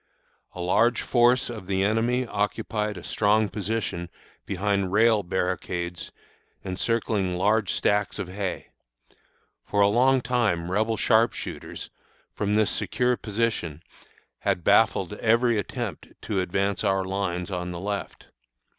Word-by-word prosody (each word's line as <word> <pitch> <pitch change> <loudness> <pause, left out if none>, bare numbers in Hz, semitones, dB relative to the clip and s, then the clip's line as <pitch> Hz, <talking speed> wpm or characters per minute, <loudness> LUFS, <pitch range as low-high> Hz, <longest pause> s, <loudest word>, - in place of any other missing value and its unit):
"A 90 - -5
large 110 +7 +2
force 125 +1 +3
of 110 -6 -7
the 95 -1 +1
enemy 115 +4 +1
occupied 105 0 -2
a - - -9
strong 105 0 +2
position 100 -5 -3 0.4
behind 100 -1 0
rail 110 +1 +4
barricades 90 -1 -3 0.5
encircling 100 -1 -1
large 105 +2 +2
stacks 105 0 +1
of 100 -4 -4
hay. 95 0 -4 0.9
For 100 - -2
a 100 - +6
long 130 +5 +4
time 110 -9 0
Rebel 110 +3 +1
sharp 115 +1 +3
shooters, - - -7 0.4
from 105 0 -1
this 110 -1 +3
secure 125 0 +1
position, 105 -9 -2 0.6
had 90 - -1
baffled - - +3
every 115 0 +2
attempt 110 - -5 0.2
to 100 -3 -1
advance 95 +2 -1
our 95 -1 +1
lines 95 -1 -2
on 90 -1 -3
the 85 -1 -5
left. 100 +1 -5
105 Hz, 130 wpm, -25 LUFS, 95-115 Hz, 0.9 s, a